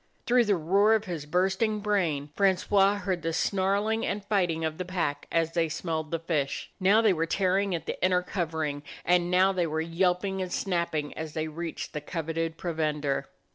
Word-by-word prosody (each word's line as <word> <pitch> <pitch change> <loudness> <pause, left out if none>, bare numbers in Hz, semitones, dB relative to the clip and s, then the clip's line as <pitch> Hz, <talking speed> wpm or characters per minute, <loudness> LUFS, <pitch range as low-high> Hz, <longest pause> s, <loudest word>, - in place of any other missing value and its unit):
Through 245 0 +4
the 205 -1 +3
roar 195 +6 +3
of 220 0 -1
his 165 -6 -5
bursting 190 +6 +1
brain 170 -9 0
Francois 195 +1 +3
heard 190 -3 -2
the 165 +1 -2
snarling 200 +5 +1
and 200 0 -2
fighting 175 -6 +1
of 160 +1 -3
the - - -1
pack 170 -6 -2
as 165 0 +1
they 165 -2 +1
smelled 160 -1 -3
the 165 - -1
fish. 155 -4 -2
Now 200 +4 +5
they 215 -4 +5
were 165 -1 -1
tearing 190 +1 +1
at 165 - -5
the - - -5
inner 180 -1 +3
covering, 160 -6 -2 0.2
and 175 0 +3
now 185 +2 +4
they 180 -3 0
were 155 0 -2
yelping 180 +3 0
and 185 -1 -4
snapping 170 -6 -1
as 160 -1 -6
they 160 0 -1
reached 165 +1 -5
the 150 - -3
coveted 165 +1 -3
provender. 150 -5 -1
175 Hz, 185 wpm, -28 LUFS, 160-195 Hz, 0.2 s, Now